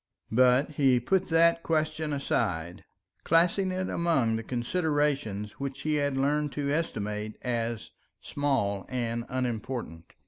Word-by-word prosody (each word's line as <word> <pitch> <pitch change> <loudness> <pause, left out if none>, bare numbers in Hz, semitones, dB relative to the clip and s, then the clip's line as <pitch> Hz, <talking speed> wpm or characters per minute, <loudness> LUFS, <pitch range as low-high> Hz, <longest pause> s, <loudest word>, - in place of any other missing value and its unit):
But 125 +5 +4
he 135 -4 +3
put 185 +10 +1
that 165 0 +4
question 155 -1 -1
aside, 90 - -1 0.4
classing 175 +3 +3
it 185 0 -2
among 140 -10 +1
the 115 - -2
considerations 135 - -1
which 140 -1 -4
he 155 - 0
had 140 -2 0
learnt 145 +1 +1
to 140 -1 -1
estimate 105 -9 -2
as 115 -2 -2 0.3
small 115 -9 -1
and 120 -2 -2
unimportant. 120 -8 -4
135 Hz, 125 wpm, -28 LUFS, 115-155 Hz, 0.4 s, But